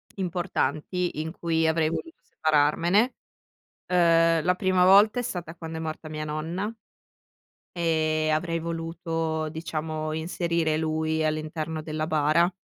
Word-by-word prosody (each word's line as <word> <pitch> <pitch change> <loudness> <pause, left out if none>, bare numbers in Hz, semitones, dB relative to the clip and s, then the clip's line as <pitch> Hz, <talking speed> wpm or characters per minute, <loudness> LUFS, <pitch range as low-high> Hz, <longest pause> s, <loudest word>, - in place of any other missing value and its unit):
importanti 175 -2 -2
in 160 +1 -4
cui 165 -1 +1
avrei 160 -1 +2
voluto 330 - -5
separarmene. 165 - +2 0.7
Ehm, 165 -2 +4
la 180 +1 +3
prima 185 -1 +3
volta 205 +5 +6
è - - -2
stata 175 -8 -5
quando 160 -1 -7
è - - -5
morta 155 0 -5
mia 155 0 -4
nonna 160 +7 -3 1.0
e 155 -2 +1
avrei 165 +1 -1
voluto, 165 -1 -3
diciamo, 155 -1 -4
inserire 165 0 0
lui 160 0 0
all'interno 155 +1 -2
della 155 0 -3
bara. 155 +3 +3
160 Hz, 125 wpm, -26 LUFS, 155-170 Hz, 1.0 s, volta